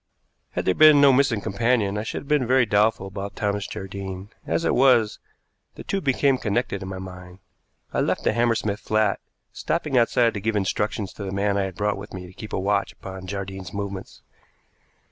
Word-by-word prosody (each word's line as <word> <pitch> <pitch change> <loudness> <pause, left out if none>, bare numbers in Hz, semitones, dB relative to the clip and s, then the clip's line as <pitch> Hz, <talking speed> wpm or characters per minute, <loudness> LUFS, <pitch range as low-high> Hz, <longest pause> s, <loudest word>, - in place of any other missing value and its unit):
Had - - -2
there 95 - +3
been 155 +2 +7
no 140 -1 +7
missing 125 -5 +2
companion 105 0 +1
I 105 - -1
should 110 - -4
have - - -15
been 145 -4 +2
very 130 0 +4
doubtful 105 -1 +2
about 100 +1 -6
Thomas 100 -1 -1
Jardine; 95 +1 -7 0.2
as 165 - 0
it - - +2
was, 125 -5 +4 0.6
the - - -9
two 195 - -2
became 135 -2 +2
connected 105 -1 -1
in 95 - -6
my 95 - -5
mind. 90 -1 -9 0.6
I - - 0
left - - 0
the - - +2
Hammersmith 115 -3 +1
flat, 110 -2 +1 0.3
stopping 140 -4 0
outside 115 0 +3
to 105 - -4
give 110 +1 -1
instructions 105 +1 -1
to 100 - -7
the 95 - -4
man 100 +1 0
I 100 -1 +1
had 95 -2 -6
brought 105 0 0
with 100 -1 -9
me 90 -1 -7
to 90 - -13
keep 110 +2 -9
a - - -1
watch 100 +1 0
upon 95 -1 -9
Jardine's 95 0 -6
movements. 100 -1 -6
105 Hz, 200 wpm, -24 LUFS, 95-120 Hz, 0.6 s, been